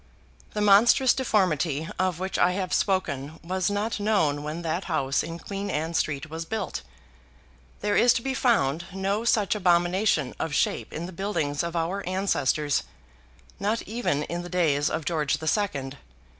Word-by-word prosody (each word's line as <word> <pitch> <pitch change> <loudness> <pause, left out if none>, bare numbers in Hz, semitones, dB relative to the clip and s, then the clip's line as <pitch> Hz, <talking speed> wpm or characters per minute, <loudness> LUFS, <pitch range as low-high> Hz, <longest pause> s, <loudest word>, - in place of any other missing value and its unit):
The 210 - -2
monstrous 225 +6 +6
deformity 170 - +1
of 185 -2 +1
which 190 +2 -3
I 180 +1 +4
have 185 -1 -2
spoken 160 -6 -1
was 185 +2 -1
not 210 +2 -1
known 195 -9 +1
when 155 +3 -5
that 170 +3 -2
house 140 -5 0
in 165 +1 -6
Queen 200 +3 -5
Anne 160 0 -2
Street 145 -2 -1
was 160 +1 -5
built. 220 +6 -4 1.0
There 205 0 +1
is 245 - +6
to 230 - -2
be 270 - -1
found 175 - +1
no 195 +3 -1
such 215 -3 +3
abomination 175 -5 +2
of 155 -2 -2
shape - - 0
in 165 - -5
the 180 - -7
buildings 165 -6 -1
of 170 0 -4
our 170 +4 -1
ancestors, 155 -6 +1 0.8
not 210 +3 0
even 215 -10 -1
in 170 +3 -4
the 175 - -8
days 155 -5 +2
of 160 - -3
George 155 -4 0
the 160 - -6
Second. 145 -9 -1
175 Hz, 165 wpm, -26 LUFS, 155-200 Hz, 1.0 s, monstrous